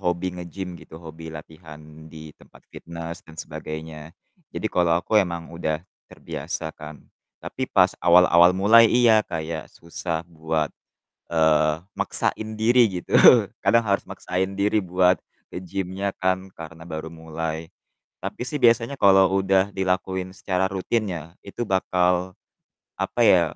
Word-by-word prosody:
hobi 90 Hz, 0 st, -1 dB
nge-gym 90 Hz, +1 st, -7 dB
gitu, 80 Hz, -, -13 dB
hobi 80 Hz, -1 st, -10 dB
latihan 75 Hz, 0 st, -12 dB
di 80 Hz, -1 st, -11 dB
tempat -, -, -20 dB
fitnes 85 Hz, +1 st, -8 dB
dan 80 Hz, -4 st, -16 dB
sebagainya. 80 Hz, 0 st, -8 dB, 0.4 s
Jadi, -, -, -4 dB
kalau 85 Hz, -2 st, +2 dB
aku 105 Hz, +4 st, +2 dB
emang 85 Hz, -3 st, -4 dB
udah 80 Hz, -2 st, -2 dB, 0.3 s
terbiasa 80 Hz, -1 st, -6 dB
kan, 75 Hz, -1 st, -10 dB, 0.4 s
tapi -, -, -5 dB
pas -, -, +3 dB
awal-awal 85 Hz, 0 st, +6 dB
mulai 110 Hz, +4 st, +6 dB
iya, 120 Hz, -3 st, +5 dB
kayak 80 Hz, -2 st, -5 dB
susah 85 Hz, -1 st, -5 dB
buat, 80 Hz, -2 st, -3 dB, 0.6 s
eee, 80 Hz, 0 st, +2 dB, 0.2 s
maksain 110 Hz, 0 st, -2 dB
diri 120 Hz, +3 st, +4 dB, 0.2 s
gitu, -, -, -15 dB, 0.5 s
kadang 115 Hz, 0 st, +3 dB
harus 100 Hz, -1 st, 0 dB
maksain 95 Hz, +2 st, -3 dB
diri 105 Hz, +2 st, +1 dB
buat 90 Hz, -1 st, +2 dB, 0.3 s
ke -, -, -5 dB
gym-nya 95 Hz, +1 st, -4 dB
kan, 95 Hz, +1 st, -1 dB
karena 80 Hz, 0 st, -10 dB
baru 80 Hz, -1 st, -6 dB
mulai. 80 Hz, 0 st, -5 dB, 0.6 s
Tapi 100 Hz, +5 st, -5 dB
sih 150 Hz, -, -3 dB
biasanya 115 Hz, +3 st, +3 dB
kalo 95 Hz, -1 st, +5 dB
udah 95 Hz, 0 st, +2 dB
dilakuin 95 Hz, 0 st, -2 dB
secara 95 Hz, 0 st, -1 dB
rutin 105 Hz, +3 st, -1 dB
ya, 80 Hz, 0 st, -7 dB
itu 105 Hz, +4 st, -5 dB
bakal, 90 Hz, -1 st, 0 dB, 0.6 s
apa -, -, -3 dB
ya, -, -, +6 dB
90 Hz, 135 wpm, -23 LUFS, 80-95 Hz, 0.6 s, awal-awal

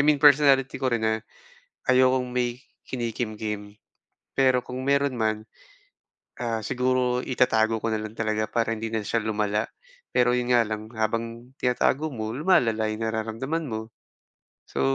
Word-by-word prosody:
mean 150 Hz, +1 st, +5 dB
personality 140 Hz, -3 st, +5 dB
ko 130 Hz, -, +1 dB
rin 115 Hz, -3 st, 0 dB
na 110 Hz, 0 st, +1 dB, 0.7 s
ayokong 130 Hz, 0 st, +4 dB
may 120 Hz, 0 st, 0 dB, 0.2 s
kinikimkim. 110 Hz, -3 st, -4 dB, 0.6 s
Pero 130 Hz, -2 st, +4 dB
kung 125 Hz, +1 st, -6 dB
meron 140 Hz, -1 st, +2 dB
man, 110 Hz, -1 st, -1 dB, 0.9 s
ah, 115 Hz, -2 st, -1 dB
siguro 125 Hz, 0 st, +1 dB
itatago 115 Hz, -3 st, +2 dB
ko 115 Hz, -, -2 dB
na 110 Hz, -1 st, -1 dB
lang 110 Hz, 0 st, -7 dB
talaga 110 Hz, -1 st, -1 dB
para 115 Hz, -1 st, 0 dB
hindi 110 Hz, 0 st, -4 dB
na 110 Hz, -, 0 dB
siya 115 Hz, -2 st, 0 dB
lumala. 105 Hz, -1 st, -1 dB, 0.4 s
Pero 125 Hz, 0 st, +3 dB
yun 125 Hz, 0 st, 0 dB
nga 120 Hz, -3 st, +4 dB
lang, 110 Hz, +1 st, -5 dB
habang 115 Hz, +3 st, -3 dB
tinatago 135 Hz, +4 st, +1 dB
mo, 110 Hz, -1 st, -4 dB
lumalala 115 Hz, -, +2 dB
yung 110 Hz, +1 st, -4 dB
nararamdaman 115 Hz, +8 st, -2 dB
mo. 110 Hz, 0 st, -6 dB, 0.7 s
So, 70 Hz, -, -4 dB
115 Hz, 145 wpm, -26 LUFS, 110-130 Hz, 0.9 s, mean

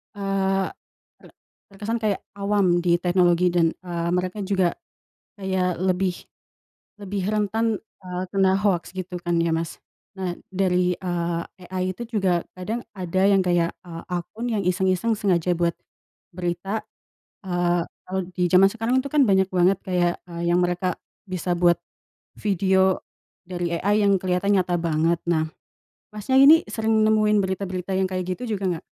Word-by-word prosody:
eee, 195 Hz, -1 st, 0 dB, 0.5 s
ter -, -, -16 dB, 0.5 s
terkesan 220 Hz, +4 st, -2 dB
kayak 210 Hz, -2 st, 0 dB, 0.2 s
awam 200 Hz, -3 st, +2 dB
di 175 Hz, -1 st, +4 dB
teknologi 175 Hz, 0 st, +3 dB
dan, 170 Hz, -2 st, +3 dB
eee, 170 Hz, -1 st, -3 dB
mereka 185 Hz, +3 st, -2 dB
juga 190 Hz, -3 st, +1 dB, 0.6 s
kayak 185 Hz, -3 st, -1 dB
lebih 185 Hz, -1 st, +1 dB, 0.9 s
lebih 200 Hz, -1 st, -3 dB
rentan, 215 Hz, +1 st, 0 dB, 0.3 s
eee, 180 Hz, 0 st, -3 dB
kena 190 Hz, -1 st, +3 dB
hoax 190 Hz, -4 st, 0 dB
gitu 185 Hz, -1 st, -4 dB
kan 175 Hz, -1 st, 0 dB
ya, 170 Hz, -, +1 dB
Mas? 165 Hz, 0 st, -3 dB, 0.4 s
Nah 180 Hz, -2 st, -3 dB, 0.2 s
dari, 180 Hz, -1 st, +2 dB
eee, 175 Hz, -2 st, -2 dB, 0.3 s
AI 185 Hz, 0 st, -1 dB
itu 235 Hz, -, -6 dB
juga 180 Hz, -4 st, +1 dB
kadang 215 Hz, +6 st, -4 dB
ada 185 Hz, -1 st, -2 dB
yang 195 Hz, -1 st, +5 dB
kayak, 175 Hz, -2 st, +1 dB
eee, 165 Hz, -2 st, -9 dB
akun 180 Hz, +6 st, -4 dB
yang 210 Hz, -, 0 dB
iseng-iseng 190 Hz, +4 st, +1 dB
sengaja 180 Hz, -3 st, +1 dB
buat 170 Hz, 0 st, +1 dB, 0.6 s
berita, 180 Hz, +4 st, -3 dB, 0.6 s
eee, 175 Hz, -1 st, +1 dB, 0.2 s
kalau 190 Hz, +1 st, -2 dB
di 180 Hz, -1 st, 0 dB
zaman 185 Hz, +2 st, +6 dB
sekarang 230 Hz, +3 st, 0 dB
itu 280 Hz, -, -6 dB
kan 295 Hz, -2 st, +5 dB
banyak 190 Hz, 0 st, +4 dB
banget 180 Hz, +1 st, +4 dB
kayak, 175 Hz, -2 st, +1 dB, 0.2 s
eee, 170 Hz, 0 st, -3 dB
yang 175 Hz, -, +3 dB
mereka 180 Hz, 0 st, 0 dB, 0.3 s
bisa 180 Hz, -1 st, -1 dB
buat 175 Hz, 0 st, +4 dB, 0.6 s
video 190 Hz, -1 st, +2 dB, 0.4 s
dari 175 Hz, -1 st, -2 dB
AI 205 Hz, +3 st, +2 dB
yang 200 Hz, -1 st, +4 dB
keliatan 185 Hz, +2 st, +1 dB
nyata 175 Hz, -1 st, 0 dB
banget. 165 Hz, 0 st, +1 dB
Nah, 160 Hz, -1 st, +2 dB, 0.7 s
Masnya, 215 Hz, +5 st, 0 dB
ini 310 Hz, +4 st, +8 dB
sering 220 Hz, 0 st, 0 dB
nemuin 215 Hz, -1 st, +3 dB
berita-berita 190 Hz, -1 st, -3 dB
yang 190 Hz, -, +2 dB
kayak 185 Hz, -1 st, -2 dB
gitu 245 Hz, -3 st, -4 dB
juga 185 Hz, -3 st, -1 dB
gak? -, -, -46 dB
185 Hz, 150 wpm, -24 LUFS, 175-200 Hz, 0.9 s, ini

